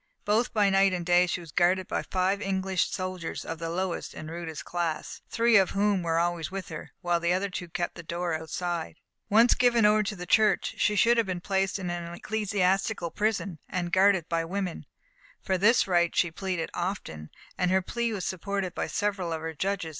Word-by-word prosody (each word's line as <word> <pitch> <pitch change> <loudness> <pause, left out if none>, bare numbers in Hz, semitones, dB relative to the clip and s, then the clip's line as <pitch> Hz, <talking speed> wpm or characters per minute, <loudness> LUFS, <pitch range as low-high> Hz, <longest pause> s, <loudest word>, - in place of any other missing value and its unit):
Both 220 +4 +2
by 205 -3 +3
night 195 0 +4
and 175 -2 -3
day 175 +1 +4
she 175 - -2
was 165 -3 -11
guarded 180 +3 +2
by - - -1
five 190 +2 0
English 190 -2 0
soldiers 185 -2 -4
of 165 0 -5
the 165 -1 -3
lowest 180 +1 -3
and 155 0 -7
rudest 165 -2 -6
class, 170 -3 -3
three 230 -1 +4
of 190 -2 +4
whom 200 -2 +2
were 165 -1 0
always 170 -1 0
with 190 -1 -6
her, 155 - -8
while 175 -1 +1
the 170 +1 +1
other 190 +2 -1
two 180 -1 -5
kept 175 +1 -2
the - - -9
door 170 +1 -3
outside. 160 +1 -3 0.3
Once 230 +4 +6
given 240 -3 +3
over 210 +1 +5
to 210 0 -3
the 180 -1 -7
Church, 215 +4 +3
she 210 - +2
should 235 +3 +4
have 230 -3 +2
been 185 -2 -2
placed 195 +1 0
in 180 -3 -4
an 170 -1 -5
ecclesiastical 195 -3 0
prison, 200 -4 -1
and 175 -1 -2
guarded 190 -3 +4
by 165 -1 0
women. 185 0 -4 0.6
For 190 - 0
this 220 +4 +4
right 175 -2 +2
she 175 - +2
pleaded 180 -1 -3
often, 175 - -4 0.3
and 180 - +1
her 190 0 +2
plea 235 +4 -2
was 200 -4 -3
supported 190 0 -3
by - - -2
several 200 -4 -1
of 160 -1 -3
her 160 0 -4
judges. 190 0 -2
185 Hz, 205 wpm, -28 LUFS, 170-200 Hz, 0.6 s, Once